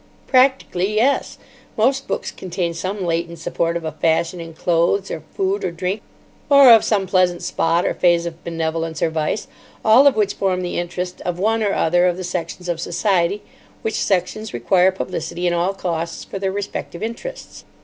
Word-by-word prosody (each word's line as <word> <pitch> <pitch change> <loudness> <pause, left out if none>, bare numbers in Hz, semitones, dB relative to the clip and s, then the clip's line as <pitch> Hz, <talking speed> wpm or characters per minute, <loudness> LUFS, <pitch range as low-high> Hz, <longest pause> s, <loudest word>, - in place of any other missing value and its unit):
"Practically, 255 -7 +2
yes. 255 +6 +1 0.4
Most 265 +5 +2
books - - -3
contain 175 -2 -3
some 185 +3 -3
latent 170 0 -2
support 170 +1 -1
of 165 - -7
a 160 - -2
fashion 165 +3 0
in 165 -1 -8
clothes 175 +4 +1
or - - -4
food 195 +1 0
or 185 - 0
drink, 180 +4 -3 0.5
or 280 -3 +8
of 225 - +6
some 200 -3 +1
pleasant 180 -2 +1
spot 165 +2 +1
or - - +1
phase 175 -1 +2
of 170 -1 -7
benevolence 165 -1 -2
or 160 - +1
vice, 160 +6 -2 0.4
all 235 +6 +7
of 280 - +4
which 210 -2 +1
form 185 -2 -1
the 175 - -2
interest 180 +1 -4
of 180 -1 -3
one 220 +4 +1
or 205 -2 +1
other 175 +2 +3
of 175 -1 0
the 185 - -5
sections 180 0 -4
of 170 -1 -2
society, 195 0 0 0.4
which 220 - -1
sections 195 - -1
require 180 +10 +3
publicity 180 -1 -4
at 175 - +2
all 175 +3 0
costs 170 -3 -3
for 195 - -7
their 190 0 -1
respective 200 -2 -5
interests." 235 - -7
180 Hz, 180 wpm, -20 LUFS, 170-205 Hz, 0.5 s, or